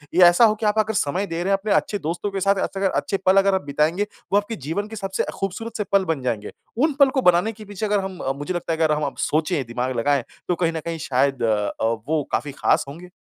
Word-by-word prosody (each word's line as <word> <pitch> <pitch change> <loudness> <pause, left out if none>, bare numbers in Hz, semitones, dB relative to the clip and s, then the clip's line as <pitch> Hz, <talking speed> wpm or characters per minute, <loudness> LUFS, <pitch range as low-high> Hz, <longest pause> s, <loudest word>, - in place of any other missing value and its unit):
या 180 0 +8
ऐसा 175 +7 +6
हो 215 - +4
कि 215 - -4
आप 210 +1 +2
अगर 220 +1 +1
समय 185 +2 0
दे 165 0 -3
रहे 195 - 0
हैं - - +4
अपने 210 +1 -3
अच्छे 205 - +1
दोस्तों 170 +6 -3
के 195 - -2
साथ 200 +1 +3
ऐसे 195 - -4
अगर 195 - +2
अच्छे 195 - -1
पल 190 +1 +5
अगर 195 0 +4
आप - - 0
बिताएँगे, 155 +8 +1 0.3
वह 200 - +6
आपके 205 +2 -5
जीवन 205 +6 -2
के 220 - -8
सबसे 195 -2 -2 0.2
ख़ूबसूरत 210 +4 -4
से 210 - 0
पल 195 -1 +3
बन 160 -5 -1
जाएँगे। 110 -4 -2 0.3
उन 295 +4 +2
पल 280 - +7
को 265 0 0
बनाने 180 +2 +4
के 215 -1 -12
पीछे 205 +1 -4
अगर 205 -1 +2
हम 190 -2 -5
अ, 135 - -1
मुझे 145 +6 -4
लगता 170 -1 -2
है - - -2
कि 165 - +1
अगर 155 -1 +3
हम 150 - -2
अब 140 - -5
सोचें, 155 -1 0
दिमाग 125 +2 -2
लगाएँ, 140 +2 +2 0.2
तो 180 - +1
कहीं 165 -1 +1
न 160 - -2
कहीं 165 -1 -3
शायद 135 0 +1
अ, 105 -2 +1 0.3
वो 155 -1 +1
काफ़ी 145 - -1
खास - - +3
होंगे। 170 +6 -10
180 Hz, 275 wpm, -22 LUFS, 150-205 Hz, 0.3 s, या